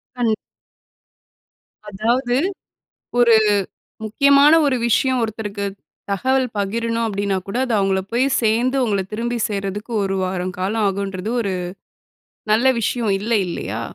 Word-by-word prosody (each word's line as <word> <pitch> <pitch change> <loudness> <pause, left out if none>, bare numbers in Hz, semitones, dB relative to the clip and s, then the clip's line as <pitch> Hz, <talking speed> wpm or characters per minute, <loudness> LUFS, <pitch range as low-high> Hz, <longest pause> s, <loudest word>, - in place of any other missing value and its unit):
கண் 235 -3 +1 1.6
அதாவது, 240 +5 0 0.8
"ஒரு 235 -2 +6 0.7
முக்கியமான 280 +7 +5
ஒரு 260 -2 +2
விஷயம் 255 +2 +2
ஒருத்தருக்கு 210 -2 -3 0.4
தகவல் 260 +6 +1
பகிரணும்." 230 +3 -1
அப்படீன்னாக்கூட 200 +1 -2
அது 240 -3 -1
அவுங்கள 195 -1 +1
போய் 250 +3 +2 0.2
சேர்ந்து, 235 +5 +2
உங்கள 200 -4 0
திரும்பி 235 +2 -2
சேர்றதுக்கு 205 +3 -4
ஒரு 195 0 -1
வாரம் 185 0 -3
காலம் 210 +4 0
ஆகும்ன்றது 195 +1 -3
ஒரு 195 -3 -2 1.0
நல்ல 235 +5 +4
விஷயம் 230 -1 0
இல்ல, 225 +3 -4 0.2
இல்லையா? 115 - -4
220 Hz, 110 wpm, -20 LUFS, 195-240 Hz, 1.6 s, ஒரு